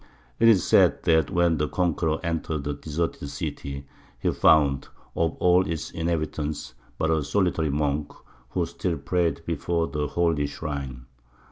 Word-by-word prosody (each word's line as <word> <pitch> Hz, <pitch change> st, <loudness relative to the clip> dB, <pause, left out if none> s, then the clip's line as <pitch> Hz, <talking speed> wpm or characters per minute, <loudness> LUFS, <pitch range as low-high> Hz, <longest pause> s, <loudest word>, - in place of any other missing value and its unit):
It 115 Hz, -, +5 dB
is 105 Hz, -6 st, +6 dB
said -, -, +4 dB
that 80 Hz, -3 st, +3 dB
when 85 Hz, -3 st, +2 dB
the 75 Hz, -, +1 dB
conqueror 80 Hz, -2 st, 0 dB
entered 80 Hz, -3 st, -2 dB
the 75 Hz, +1 st, -2 dB
deserted 75 Hz, 0 st, -3 dB
city 70 Hz, 0 st, -5 dB, 0.3 s
he -, -, 0 dB
found 70 Hz, -4 st, +4 dB, 0.3 s
of 80 Hz, -1 st, +1 dB
all 90 Hz, +1 st, +5 dB
its 80 Hz, -4 st, -4 dB
inhabitants 80 Hz, -4 st, -3 dB, 0.2 s
but 80 Hz, -, +1 dB
a 80 Hz, -2 st, +1 dB
solitary 80 Hz, -1 st, +1 dB
monk, 75 Hz, 0 st, -1 dB, 0.4 s
who 90 Hz, +2 st, 0 dB
still 85 Hz, 0 st, -3 dB
prayed 85 Hz, +3 st, 0 dB
before 85 Hz, 0 st, -1 dB
the 75 Hz, +1 st, -2 dB
holy 80 Hz, -2 st, +1 dB
shrine. 70 Hz, -5 st, -5 dB
80 Hz, 145 wpm, -25 LUFS, 75-85 Hz, 0.4 s, is